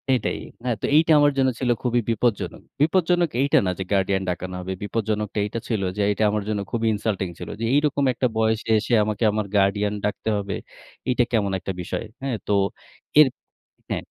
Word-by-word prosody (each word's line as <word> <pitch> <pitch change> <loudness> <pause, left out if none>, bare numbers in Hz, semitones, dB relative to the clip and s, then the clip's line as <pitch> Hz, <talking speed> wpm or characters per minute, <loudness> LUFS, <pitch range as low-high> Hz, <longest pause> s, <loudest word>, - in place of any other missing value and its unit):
এটাই। 120 - -2 0.3
আ - - +2
তো - - -1
এইটা 160 +1 +5
আমার 145 0 +5
জন্য 130 -1 +4 0.3
খুবই 120 -1 +2
বিপজ্জনক। 115 -1 0 0.2
বিপজ্জনক 175 +1 +3
এইটা 140 - +3
না - - +1
যে, - - -1
গার্ডিয়ান 95 0 +1
ডাকানো 90 +1 -4
হবে, 95 +1 -4
বিপজ্জনকটা 105 -1 -2
এইটা 110 +3 -4
ছিল 110 -4 -1 0.2
যে, 105 - +1
এইটা 105 +1 +1
আমার 105 -1 -1
জন্য 105 -2 -1
খুবই 115 -1 0
ইনসাল্টিং 100 -3 -2
ছিল। - - -7
যে, - - -4
এইরকম 145 -1 +2
একটা 125 - +1
বয়সে 110 0 +1
এসে 115 +3 -1
আমাকে 110 +1 -2
আমার 105 -1 -1
গার্ডিয়ান 100 +1 +2
ডাকতে 105 +1 -2
হবে? 100 -2 -3 0.5
এইটা 125 -1 +3
কেমন 100 -4 +1
একটা 95 - -4
বিষয়, 100 - -4 0.2
হ্যাঁ? 135 -3 -1
তো - - -1 0.7
এর 150 - +9 0.6
হ্যাঁ। - - -2
110 Hz, 180 wpm, -23 LUFS, 100-125 Hz, 0.7 s, এর